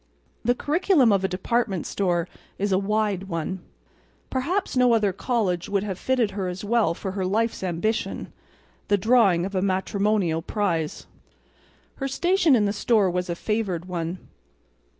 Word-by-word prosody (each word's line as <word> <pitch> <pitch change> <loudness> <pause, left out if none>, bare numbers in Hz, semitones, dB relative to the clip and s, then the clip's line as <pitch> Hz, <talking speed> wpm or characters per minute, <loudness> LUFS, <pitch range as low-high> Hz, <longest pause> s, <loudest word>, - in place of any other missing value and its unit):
The 245 +2 +2
curriculum 300 - +3
of 195 -1 +2
a - - +2
department 190 0 -1
store 175 -3 0 0.3
is 200 +1 -1
a 185 - +3
wide 205 -1 0
one. 180 +1 -3 0.7
Perhaps 330 +10 -1
no 250 -2 +5
other 205 -4 +1
college 190 -6 -1
could 200 -1 0
have 195 -3 -4
fitted 250 -5 +1
her 190 -1 -3
as 180 +3 -5
well 215 -6 +2
for 190 - -5
her 190 0 -3
life's 220 +5 0
ambition—the 200 +2 -3
drawing 200 -5 +4
of 195 - -5
a 185 - 0
matrimonial 190 -2 0
prize. 170 -5 -2 0.9
Her 270 - -2
station 340 +2 +3
in 215 -3 +3
the 200 - 0
store 210 -3 +2
was 180 0 -2
a 170 - -1
favored 195 -4 -2
one. 175 -1 -3
200 Hz, 150 wpm, -24 LUFS, 185-230 Hz, 0.9 s, no